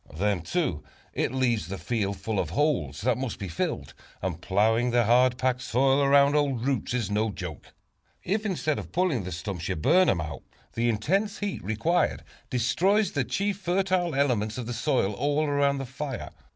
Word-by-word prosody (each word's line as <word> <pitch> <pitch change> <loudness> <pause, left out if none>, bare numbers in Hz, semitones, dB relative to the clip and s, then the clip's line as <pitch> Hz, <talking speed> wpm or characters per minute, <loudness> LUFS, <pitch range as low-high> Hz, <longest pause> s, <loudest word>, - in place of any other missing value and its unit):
Then 100 +1 0
too, 85 - -1 0.3
it - - 0
leaves 125 -6 0
the 95 +2 -5
field 100 -2 -2
full 110 -3 -2
of - - -1
holes, 125 - 0
that 125 +2 +1
must 130 -3 -3
be 100 - -5
filled; 80 - -3 0.3
and 90 -2 -4
plowing 110 +6 +2
the 120 0 +3
hard 125 +2 +4
packed 125 -1 0
soil 135 +2 +2
around 140 +1 +5
old 135 -5 +1
roots 130 -3 -1
is 115 -5 -1
no 110 +2 +1
joke. 100 - -7 0.5
If 205 +4 -1
instead 170 -7 -1
of - - -8
pulling 165 - 0
the 90 - -5
stumps, 90 0 -4
you - - 0
burn 175 - +4
them 90 - +2
out, 75 -3 -5 0.3
the 120 +1 +1
intense 195 - 0
heat 205 -2 -4
required 115 - 0 0.3
destroys 185 - +2
the 140 - 0
chief 195 - -1
fertile 180 -3 0
elements 120 -6 +1
of 125 - -4
the 120 - -4
soil 120 -4 +1
all 145 +6 0
around 140 -1 +2
the 135 - -4
fire. 135 0 -5
125 Hz, 185 wpm, -27 LUFS, 105-150 Hz, 0.5 s, around